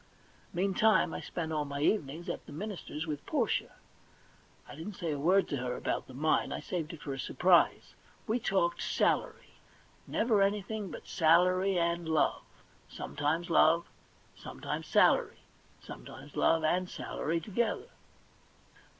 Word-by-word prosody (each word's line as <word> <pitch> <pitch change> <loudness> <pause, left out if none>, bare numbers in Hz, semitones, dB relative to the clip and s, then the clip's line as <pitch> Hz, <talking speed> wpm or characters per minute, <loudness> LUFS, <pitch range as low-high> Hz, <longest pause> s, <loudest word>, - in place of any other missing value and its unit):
Meantime 195 0 +2
I - - -4
spent 160 -2 -4
all 150 -1 0
my 140 0 -5
evenings 160 -1 0
at 170 - -5
the - - -10
minister's 175 -2 -5
with 150 -3 -4
Portia. - - 0 0.9
I - - -10
didn't 165 +7 -7
say 170 -3 -3
a 145 - -3
word 185 +6 +3
to 140 - -1
her 125 -1 -3
about - - -2
the 130 - -12
mine; 155 +4 +1
I - - -3
saved 165 -4 -4
it 165 - -10
for 140 - -4
a 135 - -6
surprise. 175 +7 +3 0.3
We 230 +3 0
talked 190 -6 0
salary; - - -1 0.5
never 215 -2 +2
anything 205 +1 -1
but - - -9
salary 180 +3 +3
and 170 -1 0
love; 160 -2 +2 0.5
sometimes 160 +4 -2
love, 165 +1 +4 0.4
sometimes - - -6
salary, - - +3 0.4
sometimes - - -11
love 165 -1 +3
and 180 +3 +1
salary 165 +1 -3
together. 220 - -2
170 Hz, 140 wpm, -31 LUFS, 155-195 Hz, 0.9 s, love